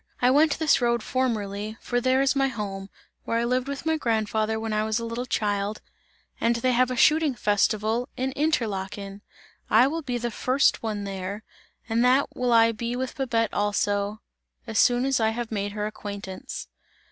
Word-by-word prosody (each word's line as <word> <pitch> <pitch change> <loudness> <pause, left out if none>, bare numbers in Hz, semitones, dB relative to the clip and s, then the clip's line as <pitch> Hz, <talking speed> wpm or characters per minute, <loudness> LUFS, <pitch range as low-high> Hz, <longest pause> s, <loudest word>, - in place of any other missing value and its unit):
I 250 +1 +4
went 295 +2 +4
this 310 -4 +3
road 235 -2 +1
formerly, 215 -4 -2
for 245 0 -1
there 260 +2 +3
is 275 +1 +2
my 270 0 +3
home, 200 -5 -5 0.3
where 230 - -1
I 230 - +1
lived 250 +2 0
with 280 +2 -5
my 320 0 +2
grandfather 220 -3 0
when 220 -1 -3
I 215 0 +1
was 220 0 0
a 230 - -3
little 235 +2 -4
child, 205 -1 -1 0.6
and 235 +1 +2
they 255 +2 +1
have 250 +1 +3
a 255 - -2
shooting 305 +1 +4
festival 215 +3 +1
in 260 +1 -1
Interlaken! 205 -9 -2 0.5
I 225 +4 +6
will 320 +5 -1
be 250 -4 -3
the 240 0 -3
first 255 +5 +2
one 215 -3 -3
there, 195 +1 -5 0.4
and 230 +1 +1
that 255 +3 +3
will 250 -1 0
I 230 0 +6
be 235 +2 -4
with 255 0 -3
Babette 230 -5 0
also, 205 0 0 0.4
as 220 - -1
soon 245 +1 +4
as 270 -2 +1
I 220 -1 +3
have 230 +1 -4
made 205 -1 -2
her 210 0 -2
acquaintance!" 200 -3 -6
230 Hz, 185 wpm, -25 LUFS, 210-255 Hz, 0.6 s, I